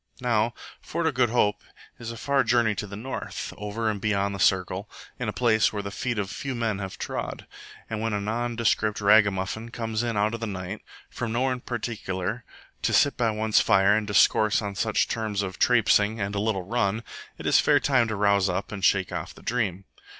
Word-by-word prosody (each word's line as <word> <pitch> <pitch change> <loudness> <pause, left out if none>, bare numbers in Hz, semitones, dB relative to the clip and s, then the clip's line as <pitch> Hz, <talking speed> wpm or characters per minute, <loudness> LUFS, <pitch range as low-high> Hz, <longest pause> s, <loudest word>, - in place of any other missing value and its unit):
Now 120 -2 +1 0.3
Fort 170 - -3
o' 160 - +3
Good 125 -3 +2
Hope 105 -3 +1 0.4
is 115 -1 -6
a 115 - -8
far 140 +2 +1
journey 115 -2 +2
to 105 +1 -5
the 100 - -8
north, 130 +6 -5
over 105 +2 -3
and 105 -2 -1
beyond 100 -2 0
the 100 - -6
Circle, 95 +2 +1 0.3
in - - -2
a - - -1
place 110 -3 +2
where 105 -1 -4
the 100 - -5
feet 120 +2 -3
of 100 -2 -2
few 135 -2 -4
men 110 -4 -1
have 95 -1 -6
trod; - - -5 0.4
and 110 -1 -4
when 115 0 -1
a 105 - 0
nondescript 110 0 0
ragamuffin 100 +1 +3
comes 115 -2 -3
in 120 -3 -2
out 105 +2 +1
of 115 - -4
the 115 - -3
night, 95 +1 -5 0.3
from 120 -2 -4
nowhere 130 +3 +1
in 125 - -5
particular, 110 -3 -4 0.4
to - - 0
sit 140 - +4
by 115 -2 +1
one's 110 0 +2
fire 95 +1 +4
and 110 -1 -1
discourse 105 +1 +4
on 100 -2 -4
such 110 +2 +1
in - - -20
terms 105 -3 -1
of 95 -1 -6
"trapsing" 110 -2 +3
and 100 0 -2
"a 100 - -1
little 105 -3 -1
run," 105 +1 -1 0.3
it - - -9
is - - +5
fair - - +4
time 130 -4 +2
to 110 - -2
rouse 100 -1 +3
up 95 +5 -3
and 100 -3 -6
shake 95 -2 +3
off - - -5
the - - -15
dream. 100 -6 -1
110 Hz, 215 wpm, -26 LUFS, 100-115 Hz, 0.4 s, is